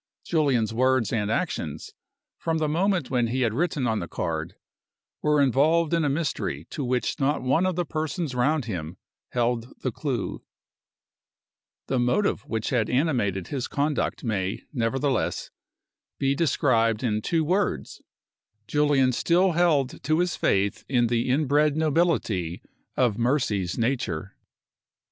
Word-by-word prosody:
Julian's 135 -9 +1
words 130 -2 +2
and 105 -2 0
actions, 85 - -3 0.5
from 165 -1 -1
the 155 -1 0
moment 175 -2 0
when 120 -2 +2
he 130 +3 -1
had 115 -4 +1
written 150 -1 0
on 110 -2 +1
the 85 - -5
card, - - -3 0.7
were 150 -1 +3
involved 150 +5 +3
in 165 -1 +2
a 145 - +2
mystery 135 - -2
to 145 - -3
which 125 +4 -1
not 140 0 +1
one 140 +8 +2
of 185 - -1
the 175 0 -1
persons 155 -1 -3
round 135 +3 +1
him 90 -5 -5 0.3
held 120 0 -1
the 130 - 0
clew. 125 -2 -3 1.4
The 130 - 0
motive 125 +13 +1
which 110 +2 -2
had 115 -4 +1
animated 120 - 0
his 135 -4 -3
conduct 145 0 -1
may, 100 -4 -2
nevertheless, 130 +1 -1 0.7
be 135 0 +1
described 125 -7 +2
in 110 -3 0
two 165 +7 +1
words: 185 +6 -1 0.6
Julian 145 -1 +3
still 180 +8 +2
held 155 -6 +1
to 155 +3 +1
his 175 0 +1
faith 100 +1 +1
in 120 -3 +3
the 120 +2 +1
inbred 145 +2 +2
nobility 150 - 0 0.3
of 120 -4 +2
Mercy's 115 -8 0
nature. 115 -8 -2
130 Hz, 140 wpm, -25 LUFS, 115-155 Hz, 1.4 s, were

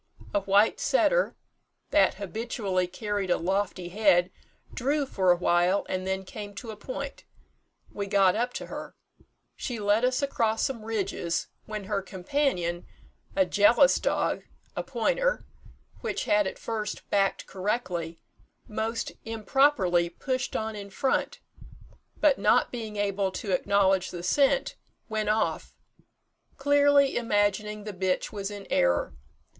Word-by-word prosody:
A 205 - +3
white 200 +2 +3
setter, - - +2 0.6
that - - +4
habitually 200 -2 -2
carried 205 +1 -3
a - - +3
lofty 185 0 -1
head, 185 -2 +3 0.4
drew 285 +4 0
for 190 -8 +2
awhile, 175 +2 +2
and 185 0 -3
then 190 0 -2
came 205 +1 -8
to 225 +2 -7
a - - -8
point. 275 +5 -6 0.7
We 200 -1 -3
got 195 -2 +4
up 240 +3 0
to - - -5
her. - - -8 0.6
She 240 -3 -4
led 205 +2 +2
us 255 +3 +1
across 225 -5 +1
some 235 -5 -2
ridges, 195 -6 -2 0.2
when 215 -1 -5
her 200 0 -1
companion, 185 - -1 0.5
a 285 -1 +4
jealous 230 - +5
dog - - 0 0.3
(a - - -1
pointer), - - 0 0.5
which - - -3
had 210 -1 +3
at - - -5
first 215 -2 -4
backed 195 -1 +1
correctly, 185 -5 -3 0.5
most 225 +2 -3
improperly 225 -6 +2
pushed 255 +8 -3
on 220 0 -2
in 200 -1 -7
front, 260 +7 -1 0.8
but, - - +4
not - - +3
being 225 -3 -5
able 200 -1 0
to 195 +1 -4
acknowledge 190 0 +2
the 175 -1 -7
scent, 280 - +2 0.3
went 215 -1 -1
off, 215 +1 0 0.8
clearly 285 0 +4
imagining 210 -1 0
the 210 -1 -6
bitch 185 0 -1
was 200 -2 -4
in 205 -1 -8
error. 85 -6 +2
205 Hz, 135 wpm, -27 LUFS, 190-235 Hz, 0.8 s, jealous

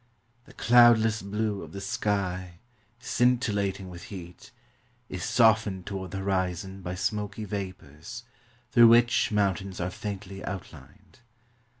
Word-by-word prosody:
The 135 - -16
cloudless 115 -2 +5
blue 105 0 -2
of - - -10
the 100 - -6
sky, 95 -3 -2 0.4
scintillating 105 -6 0
with 90 0 -10
heat, 90 -3 -10 0.6
is 95 -2 -5
softened 110 -5 +3
toward 95 -2 -5
the 95 - -5
horizon 95 0 -2
by 90 0 -5
smoky 105 +2 -3
vapors, 95 +1 -7 0.5
through 120 -1 +8
which 120 0 +4
moun 100 -2 +3
tains 95 -1 -8
are 90 +1 -2
faintly 100 0 -7
outlined. 100 +4 -9
100 Hz, 120 wpm, -27 LUFS, 95-110 Hz, 0.6 s, through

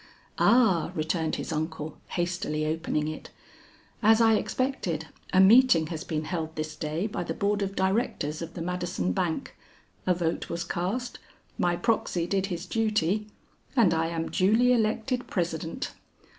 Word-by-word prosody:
"Ah," 225 -9 +4
returned 160 +1 -1
his - - -5
uncle 155 -1 -3
hastily 175 -3 -2
opening 155 -1 -1
it. 155 - -6 0.7
"As 220 +1 +6
I 225 -1 +5
expected, 210 - -1 0.2
a 185 - +4
meeting 195 -4 +7
has 160 - -5
been 155 -3 -2
held 160 -1 -4
this 155 0 -4
day 155 +5 -2
by 210 -5 -3
the 165 -1 -4
board 205 0 0
of 195 0 -2
Directors 190 -6 0
of 165 - -7
the 165 - -4
Madison 175 - -2
Bank, 165 - -2 0.5
a 180 - +4
vote 170 -1 -2
was 170 0 -2
cast, 210 +8 -3 0.4
my 175 0 +2
proxy 175 -3 0
did 195 +2 0
his 175 -2 -4
duty 215 -1 0 0.5
and 215 -10 +5
I 165 0 +1
am 165 -1 -3
duly 220 +6 +4
elected 235 +2 0
President. 165 -3 -3
175 Hz, 150 wpm, -27 LUFS, 160-210 Hz, 0.7 s, meeting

